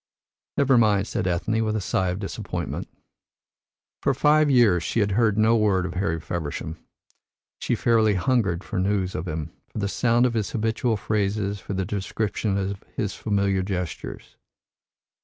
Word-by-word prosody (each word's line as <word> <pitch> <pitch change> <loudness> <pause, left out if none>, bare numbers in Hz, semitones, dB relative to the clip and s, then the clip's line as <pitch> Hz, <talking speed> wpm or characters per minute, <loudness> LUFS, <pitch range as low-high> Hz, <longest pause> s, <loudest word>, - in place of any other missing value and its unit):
"Never 135 -3 +4
mind," 105 -3 +3
said 95 - -2
Ethne, 95 +6 0
with 110 -1 -1
a - - 0
sigh 95 -1 0
of 90 - -2
disappointment. 100 -1 -4 1.1
For 140 - +1
five 150 +2 +4
years 115 -10 +5
she 85 - -1
had 105 -1 +2
heard 110 0 +2
no 110 +2 +4
word 100 -5 +2
of 90 - -4
Harry 90 -3 -1
Feversham. 80 0 -4 0.8
She - - 0
fairly 110 -3 +3
hungered 95 -3 +1
for 100 - -3
news 95 -1 0
of 80 +4 -4
him, 80 0 -4 0.2
for - - -11
the 100 -2 0
sound 120 +3 +2
of 125 - +1
his 110 -3 -1
habitual 115 0 0
phrases, 100 -1 -1
for 100 - -6
the 95 0 -1
description 100 +1 -2
of 100 0 -3
his 105 -6 -2
familiar 100 -2 0
gestures. 90 -3 -5
100 Hz, 160 wpm, -25 LUFS, 95-110 Hz, 1.1 s, years